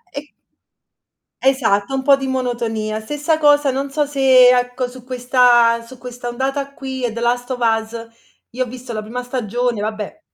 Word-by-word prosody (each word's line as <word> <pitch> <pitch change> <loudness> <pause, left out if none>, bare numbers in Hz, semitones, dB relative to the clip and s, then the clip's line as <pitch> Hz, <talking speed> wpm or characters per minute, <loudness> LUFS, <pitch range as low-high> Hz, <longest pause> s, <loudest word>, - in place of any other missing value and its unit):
E 295 +1 -7 1.1
Esatto, 260 -4 +1
un 265 - 0
po' 275 +1 +5
di 270 0 -5
monotonia. 235 -4 -2
Stessa 295 +7 -1
cosa, 290 -2 +4
non 275 +1 -3
so 295 0 0
se, 260 -3 +5
ecco, 245 +1 -2
su 250 -1 -13
questa 245 -2 +3
su 260 +1 -14
questa 245 -1 -7
ondata 270 +3 -3
qui, 265 -2 -6
è 230 - -3
"The 235 - -5
Last 245 +2 -1
of 250 - -3
Us", 225 0 -1 0.4
io 255 +2 -2
ho - - -11
visto 250 0 -9
la 215 -1 -4
prima 245 +4 -5
stagione, 245 -2 -2
vabbè. 215 +7 -5
250 Hz, 175 wpm, -19 LUFS, 235-270 Hz, 1.1 s, po